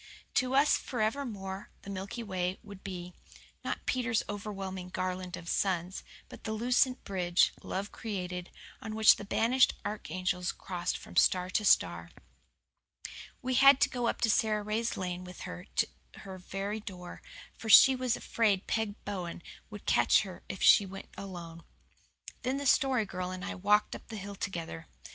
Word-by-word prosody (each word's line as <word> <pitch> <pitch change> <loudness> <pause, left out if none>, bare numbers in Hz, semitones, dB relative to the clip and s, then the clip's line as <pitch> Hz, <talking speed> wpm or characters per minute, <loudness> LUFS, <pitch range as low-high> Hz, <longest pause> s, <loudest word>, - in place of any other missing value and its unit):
To 255 +1 +1
us 280 +2 +5
forevermore 215 -5 -3
the 200 - -7
Milky 195 +5 -5
Way 185 -3 -2
would 200 -2 -12
be, 180 -2 -6 0.5
not - - -4
Peter's 250 -3 +1
overwhelming 195 -3 -5
garland 185 0 -3
of 175 -1 -11
suns, 180 0 -1 0.2
but - - -12
the 220 - -3
lucent 250 +3 +2
bridge, 180 -2 +2
love 200 +2 -4
created, 180 -4 -5 0.3
on 215 -1 -5
which 220 0 +7
the - - -7
banished 235 +5 +3
archangels 185 -3 -2
crossed 180 -1 -3
from - - -11
star 180 0 +4
to 210 - +1
star. 85 - +3 1.3
We 255 +1 -1
had 275 +1 +7
to - - +5
go 245 -2 -1
up - - +1
Sara 215 -1 +2
Ray's 220 +2 -1
lane 180 -1 -3
with 180 -1 -10
her 85 +1 -7
to - - +3 0.3
her 190 -1 -8
very 195 +3 -4
door, 180 -4 -9 0.3
for 225 - -7
she 265 +5 +9
was 255 -2 0
afraid 205 -5 +1
Peg 220 -2 -1
Bowen 180 -4 -5 0.3
would 210 -2 -10
catch - - +4
her 190 -3 -9
if 190 - -4
she - - +8
went 195 0 -9
alone. 170 -4 -8 0.8
Then 260 +2 -1
the 285 - -4
Story 260 -4 +3
Girl 185 -2 -4
and 185 0 -5
I - - -3
walked 210 +3 +2
up - - -11
the 220 - -7
hill 200 0 -6
together. 170 - -5
195 Hz, 160 wpm, -31 LUFS, 180-220 Hz, 1.3 s, she